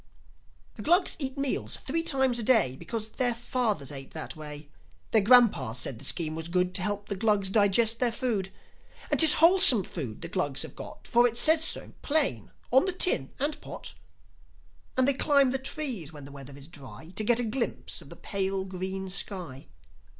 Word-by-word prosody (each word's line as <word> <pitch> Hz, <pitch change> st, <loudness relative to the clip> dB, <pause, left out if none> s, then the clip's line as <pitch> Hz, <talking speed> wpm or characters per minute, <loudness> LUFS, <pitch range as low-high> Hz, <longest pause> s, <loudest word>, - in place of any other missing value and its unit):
The -, -, -8 dB
Glugs 350 Hz, -, +2 dB
eat 270 Hz, -1 st, -4 dB
meals 275 Hz, -2 st, -3 dB
three 325 Hz, +5 st, -3 dB
times 265 Hz, -6 st, 0 dB
a -, -, -2 dB
day 220 Hz, -, +2 dB
Because 220 Hz, -, -7 dB
their 245 Hz, -2 st, -1 dB
fathers 230 Hz, -, -3 dB
ate 135 Hz, 0 st, -10 dB
that 160 Hz, -, -7 dB
way. 150 Hz, -1 st, -8 dB, 0.4 s
Their 220 Hz, -, +3 dB
grandpas 220 Hz, -, +3 dB
said 125 Hz, -2 st, -4 dB
the 140 Hz, -, -5 dB
scheme 155 Hz, +1 st, +1 dB
was 160 Hz, 0 st, -6 dB
good 180 Hz, +1 st, -1 dB
To 190 Hz, -, 0 dB
help 205 Hz, +2 st, -3 dB
the 200 Hz, -, -3 dB
Glugs 200 Hz, -2 st, 0 dB
digest 220 Hz, +2 st, +2 dB
their 245 Hz, -2 st, +1 dB
food. 220 Hz, -6 st, -3 dB, 0.6 s
And -, -, 0 dB
'tis 320 Hz, -2 st, +11 dB
wholesome 335 Hz, -, +7 dB
food 130 Hz, -12 st, -8 dB
the -, -, -6 dB
Glugs 145 Hz, -6 st, -3 dB
have -, -, -11 dB
got, -, -, -11 dB
For 240 Hz, +1 st, +3 dB
it 235 Hz, 0 st, -5 dB
says 315 Hz, +5 st, +5 dB
so -, -, -3 dB
plain 285 Hz, -, 0 dB, 0.2 s
on 265 Hz, +6 st, +3 dB
the 375 Hz, -, -2 dB
tin 355 Hz, -, +1 dB
and 295 Hz, +2 st, -3 dB
pot. -, -, -9 dB, 1.0 s
And 260 Hz, 0 st, +2 dB
they 280 Hz, -, +2 dB
climb 275 Hz, -1 st, +2 dB
the 265 Hz, -, -2 dB
trees 260 Hz, -, -3 dB
when 145 Hz, -3 st, -12 dB
the 140 Hz, -, -13 dB
weather 140 Hz, 0 st, -12 dB
is 140 Hz, 0 st, -11 dB
dry 160 Hz, +2 st, -13 dB
To 215 Hz, -, -2 dB
get 240 Hz, +2 st, +1 dB
a -, -, -1 dB
glimpse 235 Hz, +2 st, -3 dB
of -, -, -16 dB
the -, -, -11 dB
pale 195 Hz, -1 st, -3 dB
green 190 Hz, +1 st, -6 dB
sky. 180 Hz, -7 st, -3 dB
210 Hz, 195 wpm, -26 LUFS, 165-255 Hz, 1.0 s, tis